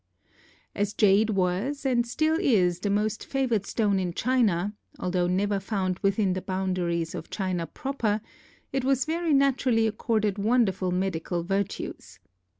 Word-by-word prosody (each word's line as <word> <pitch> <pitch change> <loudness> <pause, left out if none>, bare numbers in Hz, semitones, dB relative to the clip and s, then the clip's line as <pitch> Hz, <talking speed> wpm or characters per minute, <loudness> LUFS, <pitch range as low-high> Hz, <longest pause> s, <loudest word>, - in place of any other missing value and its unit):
As 205 0 -1
jade 210 +1 +4
was 200 +9 -1
and 240 -3 +2
still 310 +6 +1
is 180 -8 +2
the 205 - -2
most 210 +2 0
favored 245 -7 -1
stone 205 -4 +1
in 180 -2 -3
China, 210 -6 +1 0.2
although 180 -1 0
never 200 +2 +1
found 190 -2 -2
within 195 -1 +1
the 185 - -3
boundaries 180 -3 -1
of 160 - -7
China 185 -4 -2
proper, 240 -7 -2 0.5
it 270 -1 0
was 265 -1 +2
very 330 +1 -1
naturally 265 -5 +3
accorded 215 -2 0
wonderful 200 -4 +2
medical 180 -2 -1
virtues. 195 +2 -3
205 Hz, 140 wpm, -27 LUFS, 185-240 Hz, 0.5 s, jade